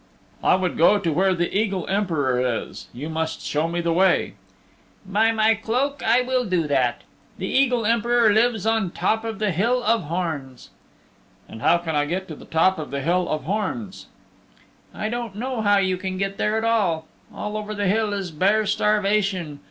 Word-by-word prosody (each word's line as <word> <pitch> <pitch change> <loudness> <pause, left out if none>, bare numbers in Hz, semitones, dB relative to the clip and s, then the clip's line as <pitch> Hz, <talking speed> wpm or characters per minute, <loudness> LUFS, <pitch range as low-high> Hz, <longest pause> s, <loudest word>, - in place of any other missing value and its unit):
"I - - +5
would 185 -3 -2
go 185 +5 +6
to 170 -6 -1
where 190 +3 +2
the 175 +2 -2
Eagle 200 -4 0
Emperor 160 -11 0 0.2
is. - - -11
You 135 +6 -7
must 160 0 -3
show 150 +2 -1
me 170 +1 -2
the 170 -1 0
way." 185 +1 +2 0.7
"By 210 +4 +2
my 220 0 +3
cloak 250 +6 -2
I 235 +3 +4
will 255 0 0
do 180 -7 0
that. 130 -4 0 0.3
The - - -4
Eagle 250 -4 +2
Emperor 235 0 +3
lives 220 -1 +2
on 225 -2 +2
the 175 - -7
top 220 +1 0
of 225 -2 -4
the 210 -1 0
Hill 235 +9 +1
of 230 -3 +1
Horns." 155 -6 -4 0.8
"And 110 - -10
how 170 +7 +4
can 165 -2 -4
I 145 0 +2
get 185 +5 -3
to 155 - -6
the - - -13
top 175 +3 +2
of 155 - -6
the 140 0 -3
Hill 180 +5 0
of 155 -3 -2
Horns?" 205 - -4 0.8
"I 215 - -4
don't 235 -2 -4
know 250 +1 -3
how 205 -1 +4
you 190 -1 +1
can 185 0 -4
get 195 +1 -3
there 210 +1 +1
at 220 - -1
all. 200 -9 +1 0.3
All 210 0 -5
over 215 0 -4
the 205 0 -1
Hill 210 +2 +1
is 195 -4 -3
bare 200 +7 +2
starvation. 200 -6 0
195 Hz, 195 wpm, -23 LUFS, 170-220 Hz, 0.8 s, go